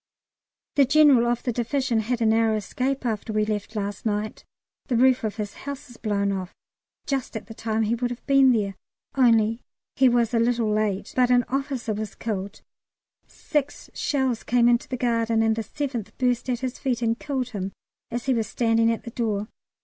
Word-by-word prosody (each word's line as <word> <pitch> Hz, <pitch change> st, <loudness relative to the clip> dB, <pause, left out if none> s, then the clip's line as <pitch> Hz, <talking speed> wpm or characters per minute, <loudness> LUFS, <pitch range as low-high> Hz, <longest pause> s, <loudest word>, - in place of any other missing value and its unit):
The 280 Hz, -, +7 dB
General 275 Hz, -4 st, +5 dB
of 240 Hz, 0 st, 0 dB
the 245 Hz, -, 0 dB
Division 245 Hz, 0 st, 0 dB
had 230 Hz, +2 st, -1 dB
a -, -, +3 dB
narrow 220 Hz, 0 st, +3 dB
escape 260 Hz, +6 st, -2 dB
after 220 Hz, -1 st, -2 dB
we 215 Hz, 0 st, +1 dB
left 215 Hz, +1 st, -3 dB
last 205 Hz, -1 st, -3 dB
night. 215 Hz, 0 st, -2 dB, 0.4 s
The 245 Hz, -, +1 dB
roof 260 Hz, 0 st, +4 dB
of 215 Hz, -2 st, -2 dB
his 210 Hz, -2 st, -4 dB
house 280 Hz, +1 st, -7 dB
was 240 Hz, -, -13 dB
blown 200 Hz, -2 st, 0 dB
off, 190 Hz, -2 st, -4 dB, 0.5 s
just 270 Hz, -4 st, -2 dB
at -, -, -8 dB
the 225 Hz, -, -10 dB
time 220 Hz, 0 st, -1 dB
he 220 Hz, +2 st, +1 dB
would 245 Hz, +1 st, -1 dB
have 245 Hz, 0 st, -7 dB
been 275 Hz, -2 st, +5 dB
there, 205 Hz, -4 st, 0 dB, 0.4 s
only 230 Hz, -3 st, +3 dB, 0.3 s
he 265 Hz, -1 st, +5 dB
was 240 Hz, -1 st, +2 dB
a 230 Hz, -, +3 dB
little 230 Hz, -2 st, +1 dB
late, 210 Hz, -2 st, -1 dB
but 250 Hz, -1 st, +3 dB
an 245 Hz, -1 st, +4 dB
officer 270 Hz, -4 st, -2 dB
was 215 Hz, 0 st, -5 dB
killed; 200 Hz, -3 st, -5 dB, 0.6 s
six 295 Hz, -3 st, -3 dB
shells 265 Hz, -5 st, 0 dB
came 240 Hz, 0 st, +3 dB
into 240 Hz, 0 st, +3 dB
the 255 Hz, -, -2 dB
garden, 230 Hz, -2 st, +1 dB
and 220 Hz, 0 st, +2 dB
the 225 Hz, -, -2 dB
seventh 245 Hz, -1 st, -5 dB
burst 250 Hz, -1 st, 0 dB
at 245 Hz, 0 st, -1 dB
his 255 Hz, -1 st, -4 dB
feet 245 Hz, -4 st, -1 dB
and 230 Hz, +1 st, +1 dB
killed 265 Hz, -4 st, -2 dB
him 195 Hz, -4 st, -4 dB, 0.4 s
as 240 Hz, 0 st, -4 dB
he 265 Hz, -, +2 dB
was 225 Hz, -3 st, 0 dB
standing 230 Hz, 0 st, +2 dB
at 230 Hz, -, -3 dB
the 235 Hz, -, -7 dB
door. 215 Hz, -3 st, -2 dB
235 Hz, 195 wpm, -25 LUFS, 220-255 Hz, 0.6 s, The